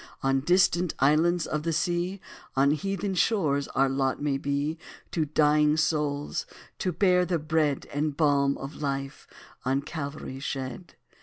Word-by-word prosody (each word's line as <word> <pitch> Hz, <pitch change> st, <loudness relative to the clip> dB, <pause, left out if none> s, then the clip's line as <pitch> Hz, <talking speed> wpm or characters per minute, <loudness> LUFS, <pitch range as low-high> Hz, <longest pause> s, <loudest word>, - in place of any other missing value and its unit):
On 135 Hz, 0 st, +2 dB
distant 175 Hz, +2 st, +2 dB
islands 155 Hz, +4 st, +3 dB
of 150 Hz, -, -2 dB
the 165 Hz, +2 st, -1 dB
sea 175 Hz, +3 st, -1 dB, 0.4 s
On 140 Hz, +1 st, +4 dB
heathen 195 Hz, +4 st, -2 dB
shores 160 Hz, -8 st, +1 dB
our 135 Hz, +1 st, +4 dB
lot 135 Hz, 0 st, 0 dB
may 145 Hz, -2 st, 0 dB
be, 145 Hz, +3 st, -2 dB, 0.3 s
To 160 Hz, -3 st, 0 dB
dying 150 Hz, 0 st, +3 dB
souls 150 Hz, -2 st, -1 dB, 0.3 s
to 185 Hz, -, 0 dB
bear 180 Hz, +1 st, +3 dB
the 180 Hz, -1 st, 0 dB
bread 155 Hz, -2 st, 0 dB
And 145 Hz, 0 st, -1 dB
balm 140 Hz, -3 st, +3 dB
of 135 Hz, +3 st, -8 dB
life 135 Hz, -1 st, -4 dB, 0.4 s
on 135 Hz, +2 st, 0 dB
Calvary 140 Hz, -4 st, -6 dB
shed. 135 Hz, +4 st, -5 dB
150 Hz, 145 wpm, -27 LUFS, 140-170 Hz, 0.4 s, On